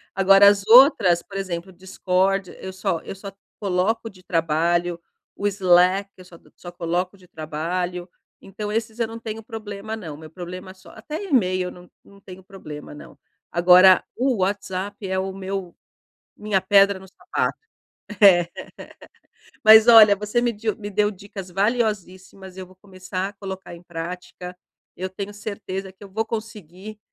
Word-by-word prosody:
Agora 195 +1 +6
as 200 0 +3
outras 225 - +6
por 195 +2 -9
exemplo, 185 -2 -5
o 190 - -15
Discord, 190 +1 -1
eu 190 - -7
só 190 -2 -2
eu - - -8
só 195 +1 -9 0.3
coloco 205 +4 -1
de 185 -3 -19
trabalho, 170 +1 0 0.4
o 205 - -5
Slack 190 0 +3
eu 185 - -14
só 175 -2 -15
co - - -24
só 175 - -10
coloco 175 +3 -3
de 180 - -20
trabalho. 175 +3 -4 0.3
Então 205 +2 -7
esses 220 +1 -3
eu 230 - 0
não 225 +1 -9
tenho 225 -1 -7
problema 215 -1 -7
não, 160 -8 -8
meu 155 0 -12
problema 180 +2 -9
só 185 - -17
até 300 - -7
email 185 - +1
não 180 0 -15
não 200 0 -19
tenho 190 -1 -12
problema 155 -8 -10
não. 145 - -13 0.3
Agora 180 +2 +6
o 255 -2 0
WhatsApp 195 +1 -3
é 190 0 -1
o 190 0 -3
meu 190 -2 -6 0.6
minha 210 -2 0
pedra 195 0 +4
no 190 - -14
sapato. - - -3 0.7
É. 175 -4 +7 1.2
Mas 220 +1 +8
olha, 215 -3 +8
você 210 +4 -1
me 240 -1 +1
diu 215 0 -3
me 205 -2 -7
deu 210 +1 +1
dicas 195 -1 -10
valiosíssimas, 195 -3 -2
eu 185 - -7
vou 185 - -20
começar 185 0 -6
a - - -15
colocar 190 -3 -8
em 170 - -15
prática. 180 +1 -8 0.4
Eu 185 +1 -4
tenho 200 +2 -7
certeza 195 -2 -6
que 190 +2 -17
eu 200 - -12
vou 220 +3 -2
conseguir, 215 -2 -8
190 Hz, 165 wpm, -22 LUFS, 180-205 Hz, 1.2 s, Mas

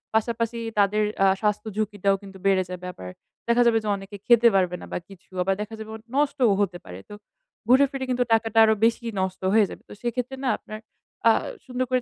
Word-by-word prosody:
পাশাপাশি 230 +1 0 0.2
তাদের 205 +1 +3 0.2
আ - - +6
স্বাস্থ্য 210 0 0
ঝুঁকিটাও 205 -2 +1
কিন্তু 195 -1 -12
বেড়ে 190 -1 +3
যাবে 180 0 -7
আবার 90 - -9 0.4
দেখা 235 +1 +4
যাবে 235 -1 +4 0.2
অনেকে 195 +1 -9
খেতে 235 -1 +6
পারবে 180 -2 +2
না - - -8
বা - - 0
কিছু 195 -1 -16
আবার 195 +1 +1
দেখা 220 +1 -6
যাবে 220 0 -8
অ - - -6 0.2
নষ্টও 280 -6 +2
হতে 185 -3 -1
পারে। 90 +1 -9
তো - - -9 0.5
ঘুরে 260 +3 +6
ফিরে 270 -1 -4
কিন্তু 250 -1 +1
টাকাটা 225 0 +1
আরো 220 - +4
বেশি 235 +1 +1 0.2
নষ্ট 190 0 -3
হয়ে 220 -1 +5
যাবে। - - -10
তো - - -9
সেক্ষেত্রে 245 +2 -3
না 255 - +1
আপনার 215 0 -9 0.5
আ - - +8 0.3
সুন্দর 255 0 -2
করে 255 -1 +1
220 Hz, 205 wpm, -24 LUFS, 195-240 Hz, 0.5 s, আ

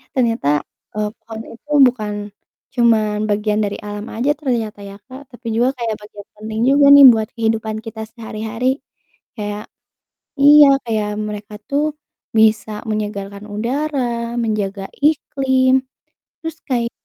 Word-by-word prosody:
Ternyata, 225 - +1 0.3
eee, 210 0 -1 0.2
pohon 225 -1 -7
itu 295 +6 -15 0.2
bukan 215 -4 -3 0.6
cuman 220 -3 +3
bagian 210 0 0
dari 200 - -4
alam 205 0 -6
aja 245 +6 0
ternyata 235 -8 -2
ya 200 0 -10
Kak, 260 +2 -9
tapi 240 -1 -10
juga 245 +3 +2
kayak 230 -2 -2
bagian 210 -1 -12
penting 220 +1 -4
juga 280 +1 +5
nih 285 -1 +10
buat 220 -1 -2
kehidupan 220 -1 -1
kita 220 0 -7
sehari-hari, 225 +1 -4 0.7
kayak 210 0 -4 0.8
iya, 295 +1 +9 0.2
kayak 215 -2 -1 0.2
mereka 210 0 -7 0.2
tuh 285 +2 +1 0.6
bisa 220 0 +3 0.2
menyegarkan 205 -1 -4
udara, 240 0 -2
menjaga 200 -3 -2 0.2
iklim, 270 -4 +2 0.7
terus 325 -1 -5
kayak 235 -3 0
225 Hz, 125 wpm, -19 LUFS, 210-250 Hz, 0.8 s, nih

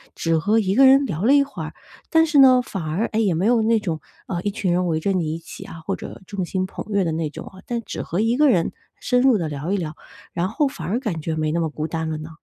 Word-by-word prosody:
只 165 -1 +1
和 205 +8 +2
一 195 -4 +1
个 270 +5 +7
人 270 +1 +6
聊 185 - -3
了 265 - +5
一 285 -1 +6
会 280 - -7
儿， - - -7 0.4
但 325 0 +5
是 305 -3 +3
呢， 255 -2 +7
反 195 -5 -5
而， 160 +8 -1
哎， 220 - -2
也 205 -5 +2
没 170 +4 0
有 235 0 +4
那 225 +1 +3
种， 170 -7 -3 0.3
呃， 175 -2 -3
一 205 - 0
群 200 -3 -1
人 180 +1 +1
围 160 -2 0
着 200 - 0
你 170 -5 0
一 - - -6
起 165 - -10
啊， 165 - -10
或 195 - -1
者 - - -9
众 195 -2 -4
星 185 +1 -2
捧 185 - -7
月 200 -2 +2
的 165 - -1
那 160 -1 -2
种 - - -9
啊， 190 - -12
但 235 -1 -2
只 - - -5
和 175 +5 -2
一 230 +2 +1
个 300 +1 +5
人 175 -9 +2 0.3
深 250 0 +2
入 260 -3 +5
地 165 -5 -2
聊 150 +6 -3
一 - - +1
聊， 160 -4 -4 0.4
然 175 +1 -1
后 280 - +1
反 165 -11 -7
而 205 +6 0
感 190 -11 -3
觉 160 +1 -2
没 155 -1 -1
那 170 - 0
么 165 -1 0
孤 155 +1 -4
单 160 -1 -3
了 155 - -3
呢？ 155 +1 -8
190 Hz, 320 characters per minute, -22 LUFS, 165-230 Hz, 0.4 s, 个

